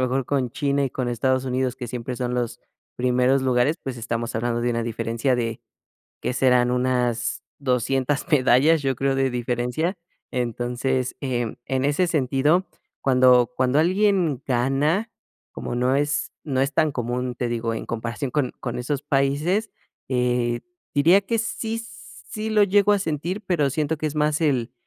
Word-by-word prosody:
mejor 130 +1 0
con 135 -4 0
China 140 +2 0
y 135 - -2
con 125 -1 -3
Estados 130 +2 +1
Unidos, 130 0 -1
que 125 -2 -6
siempre 125 +1 -5
son 125 0 -2
los 120 -1 -2 0.4
primeros 125 +2 +2
lugares, 130 +4 +2
pues 130 -2 -5
estamos 115 0 -3
hablando 120 +1 -1
de 120 - +1
una 115 0 -1
diferencia 115 +2 -1
de, 115 -2 -2 0.6
¿qué - - -1
serán? 125 -1 +3
Unas 125 -2 0 0.2
200 135 +1 0
medallas, 145 +3 +4
yo 135 -2 0
creo, 135 +2 +1
de 135 -1 +1
diferencia. 125 - -1 0.4
Entonces, 125 +1 -1
eh, 125 -3 -1
em, 115 - -5
en 130 -1 -1
ese 145 +6 +2
sentido, 150 +4 +2 0.4
cuando 125 -2 +5
cuando 130 +2 +2
alguien 180 -5 +2
gana, 140 - +1 0.4
como - - -5
no 125 +2 +2
es 145 +1 0
no 135 -4 -1
es 135 +1 0
tan 155 -1 +3
común, 125 0 -2
te 125 - -1
digo, 115 -1 -2
en - - -5
comparación 115 +4 -3
con 140 -4 +1
con 120 - -4
esos 140 +3 -2
países, 150 +9 +1 0.4
eh, 125 -2 0 0.3
diría 165 +7 +5
que 225 +4 -2
sí 225 0 -2
sí 160 - -8
lo 210 -1 +5
llego 200 +1 +3
a 205 - +3
sentir. 170 +3 -3
Pero 150 -6 +1
siento 155 +3 -1
que 155 - -3
es 155 0 -4
más 150 +1 +1
el 130 -7 +1
130 Hz, 165 wpm, -23 LUFS, 125-150 Hz, 0.6 s, cuando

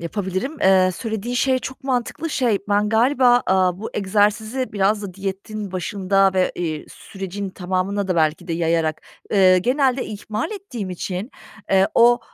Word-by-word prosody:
yapabilirim. 190 - -3
Eee, 190 -1 +5
söylediğin 225 +1 -4
şey 260 +1 +2
çok 265 +1 -8
mantıklı. 265 +5 -2
Şey, 240 -7 +1
ben 205 +1 +2
galiba, 245 +2 +4
aaa, 185 -1 +2
bu 220 - -6
egzersizi 210 +5 0
biraz 205 +1 +1
da 190 -3 -7
diyetin 195 +1 -5
başında 195 +1 +1
ve, 185 -1 +2
iii, 160 -3 -4
sürecin 195 +1 -7
tamamına 190 +2 -2
da 185 - 0
belki 160 +2 0
de - - -1
yayarak, 165 -1 0 0.3
ııı, 190 -3 +6
genelde 255 +4 +1
ihmal 215 - -4
ettiğim 270 - -6
için, 185 +5 -4 0.4
eee, 190 0 +4
o, 240 +1 +5
200 Hz, 150 wpm, -21 LUFS, 185-235 Hz, 0.4 s, ııı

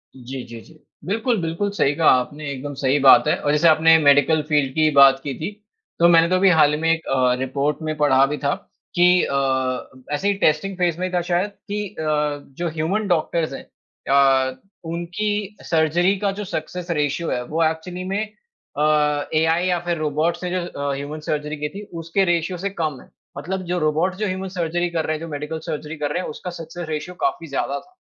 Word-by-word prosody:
जी, 130 0 -7
जी, 115 -1 -10
जी। 155 +5 -19 0.3
बिल्कुल, 225 +4 0
बिल्कुल 170 +5 -2
सही 145 -8 +2
कहा 165 +1 +2
आपने 145 +4 -6
एकदम 140 +1 -6
सही 135 +1 +2
बात 135 +2 +7
है - - +3
और 145 - +1
जैसे 150 +3 +4
आपने 160 +1 +6
मेडिकल 145 +1 +4
फ़ील्ड 145 -3 +2
की 155 +1 +3
बात 135 -1 +7
की 140 - -3
थी। 165 +6 -3 0.5
तो 170 - +6
मैंने 165 0 +5
तो 185 - +2
अभी 190 +1 +4
हाल 155 -4 +5
ही 150 - -1
में 165 - +3
एक 165 0 -1
अ, 130 -2 +2
रिपोर्ट 140 +3 -1
में 155 0 -3
पढ़ा 135 -3 +4
भी 145 +2 -3
था 140 0 0 0.4
कि 180 0 +5
अ, 140 - -2 0.8
ऐसे 195 +7 -2
ही 205 - +3
टेस्टिंग 170 +5 +1
फ़ेज़ 175 -2 0
में 185 0 -1
था 180 - +2
शायद 180 +3 +1 0.2
कि 210 0 -2
अ, 160 - -3 0.5
जो 175 - -2
ह्यूमन 165 +7 -1
डॉक्टर्स 165 -3 0
हैं। - - -7 0.5
अ, 135 -1 +4 0.4
उनकी 205 +4 -3
सर्जरी 170 +4 +2
का 200 -1 0
जो - - -2
सक्सेस 175 +1 -5
रेशियो 150 +1 -1
है। 125 - -1
वो 160 +5 0
एक्चुअली 160 +3 -2
में 205 - 0 0.6
अ, 150 - 0 0.5
एआई 160 +3 +2
या 180 -1 +1
फ़िर 175 -1 -1
रोबोट 155 +2 0
से 180 0 -4
जो 180 -1 -1
अ, 140 -4 -3
ह्यूमन 145 +3 -6
सर्जरी 150 0 -2
की 150 0 -3
थी 200 +6 -8 0.2
उसके 165 +4 +1
रेशियो 175 +1 0
से 195 +3 -3
कम 155 -8 -3
है। - - -19 0.3
मतलब 185 +6 -4
जो 180 - 0
रोबोट 155 +4 +1
जो 210 +2 -2
ह्यूमन 190 0 -3
सर्जरी 175 -1 -1
कर 165 -2 -2
रहे 155 - -1
हैं, - - -6
जो 165 - -5
मेडिकल 150 +2 -4
सर्जरी 150 +1 -4
कर 145 -1 -2
रहे 175 - -1
हैं - - -5
उसका 180 - -7
सक्सेस 165 0 -8
रेशियो 155 +4 -4
काफ़ी 165 - -2
ज़्यादा 140 0 -2
था। 365 - -22
160 Hz, 210 wpm, -22 LUFS, 145-180 Hz, 0.8 s, बात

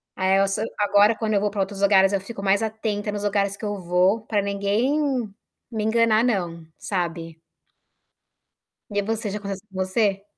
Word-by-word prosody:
Aí 190 0 +2
eu 195 0 +3
so 195 +2 -2 0.2
agora 205 +1 +4
quando 220 -1 -2
eu 205 - +3
vou 210 - +1
pra 205 0 -6
outros 195 +1 -4
lugares 195 -1 +5
eu 195 - +1
fico 200 0 -8
mais 200 +2 +3
atenta 215 -1 -2
nos 205 0 -4
lugares 200 -1 0
que - - -7
eu 205 -1 -3
vou, 180 +4 +2
pra 210 -2 +1
ninguém 200 +8 0 0.7
me 220 -2 -2
enganar 225 0 +3
não, 175 -8 -1
sabe? 165 -3 -4 1.5
E 205 0 0
você, 220 +1 -2
já 205 - -3
aconteceu 200 0 -7
com 195 - -18
você? 195 +1 0
200 Hz, 180 wpm, -23 LUFS, 195-215 Hz, 1.5 s, lugares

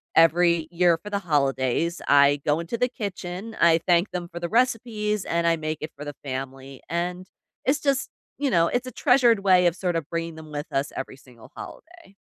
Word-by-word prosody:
every 170 0 +4
year 175 -1 +3
for 210 +5 -10
the 200 - 0
holidays, 145 0 0
I 140 0 +5
go 150 +2 +1
into 170 +6 -4
the 250 +2 +1
kitchen, 200 -1 -6
I 165 -1 +6
thank 175 +1 +3
them 175 -1 -4
for 170 - -5
the 170 0 -4
recipes 220 -3 0
and 170 0 0
I 165 0 +3
make 155 0 -3
it 155 - -5
for 145 - -8
the 145 -1 -6
family, 135 0 -6
and 180 +2 -3 0.4
it's 280 +3 +2
just, 275 -2 0 0.3
you 285 -1 +1
know, 170 -7 +3
it's 245 +5 -2
a - - -6
treasured 245 -3 +4
way 185 -2 +5
of, 170 - 0
sort 180 -2 -2
of, 165 -3 -3
bringing 165 -1 -3
them 160 -1 -11
with 145 0 -4
us 135 +1 -1
every 135 0 -6
single 125 -4 -17
holiday. 340 - -12
170 Hz, 205 wpm, -24 LUFS, 155-210 Hz, 0.4 s, I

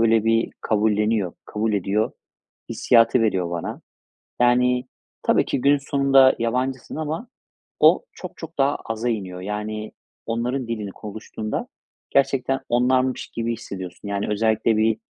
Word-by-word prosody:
böyle, 115 -1 +4
bir 115 0 +2
kabulleniyor, 105 -3 +1
kabul 110 +1 -1
ediyor 100 +2 0 0.6
hissiyatı 115 0 +4
veriyor 95 -6 +1
bana. 85 -1 -4 0.6
Yani, 125 +1 +3 0.4
tabii - - +3
ki, - - -1
günün 145 +2 +5
sonunda 135 -1 +4
yabancısın 125 +3 -2
ama 160 +9 -3 0.5
o - - +6
çok - - -9
çok 165 0 -9
daha 140 +1 +3
aza 115 +2 -2
iniyor. 95 -5 -3
Yani, 105 +2 -4 0.3
onların 120 +3 -2
dilini 110 -4 -4
konuştuğunda 110 +1 -5 0.4
gerçekten 135 -1 +2
onlarmış 130 +1 +2
gibi 115 0 -2
hissediyorsun. 95 -4 -8
Yani, 100 0 -1
özellikle 110 +1 +2
bir, 110 0 +2
115 Hz, 125 wpm, -23 LUFS, 105-130 Hz, 0.6 s, o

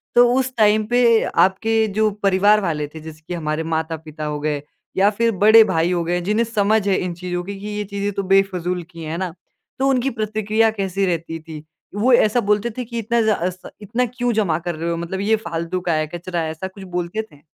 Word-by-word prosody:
तो 245 0 +7
उस 260 -1 0
टाइम 215 0 +4
पे 240 -2 +4
आपके 220 +3 +2
जो 220 0 +4
परिवार 200 +2 +4
वाले 150 -5 -2
थे, 160 +2 -11
जैसे 155 0 -11
कि - - -4
हमारे 155 -2 -2
माता-पिता 160 -1 -4
हो 150 0 -3
गए 150 -1 -2 0.4
या 195 +2 +5
फिर 230 0 +3
बड़े 215 +3 +7
भाई 175 -4 +1
हो 175 -1 0
गए, 175 +1 0
जिन्हें 210 +6 +1
समझ 215 -1 +1
है 195 - +3
इन 180 -1 -2
चीज़ों 175 0 -4
की 200 +1 -7
कि 205 - -7
ये 210 0 -3
चीज़ें 200 +1 -3
तो 200 - -2
बेफ़िजूल 185 -2 +1
की 165 -1 -9
हैं, 155 - -5
है 165 - -3
ना? 185 -2 -3 0.5
तो 270 - +2
उनकी 265 0 +1
प्रतिक्रिया 215 -1 +1
कैसी 195 -2 -1
रहती 165 -2 -2
थी, 155 -1 -10 0.3
वो 240 +5 +3
ऐसा 235 0 +4
बोलते 210 +3 +1
थे 250 - -3
कि 235 0 -5
इतना 235 +2 +1
ज़ा 205 -5 +1
स 180 0 -11
इतना 230 +5 -1
क्यों 245 0 -2
जमा 200 -8 +1
कर 175 0 -4
रहे 165 +2 -3
हो? 170 - -1
मतलब 170 +3 -4
ये 215 +3 +2
फ़ालतू 170 -3 -3
का 175 -2 0
है, 155 0 0
कचरा 175 +1 -4
है, 160 - -2
ऐसा 160 +4 -5
कुछ 190 +1 -12
बोलते 180 +3 -3
थे? 145 0 -19
190 Hz, 230 wpm, -21 LUFS, 170-220 Hz, 0.5 s, तो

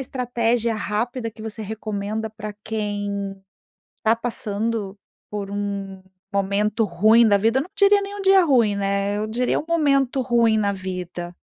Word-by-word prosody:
estratégia 240 -3 0
rápida 230 +3 -2
que 220 0 -12
você 220 0 -5
recomenda 215 +1 -4
pra 215 -1 -7
quem 205 -2 -3 0.7
tá 220 +1 +5
passando 220 -3 -2 0.3
por 205 -1 -5
um 200 -1 -4 0.3
momento 205 +3 +1
ruim 215 +5 +5
da 205 - +5
vida? 225 +6 +2
Não 330 - -5
diria 405 0 +5
nem 400 0 -6
um 405 - -5
dia 385 -1 +6
ruim, 235 -9 +3
né, 200 +1 0
eu 215 - -1
diria 240 +3 0
um - - -8
momento 275 -5 +2
ruim 235 -3 +3
na 205 -2 +1
vida. 180 -2 -6
215 Hz, 150 wpm, -22 LUFS, 200-240 Hz, 0.7 s, dia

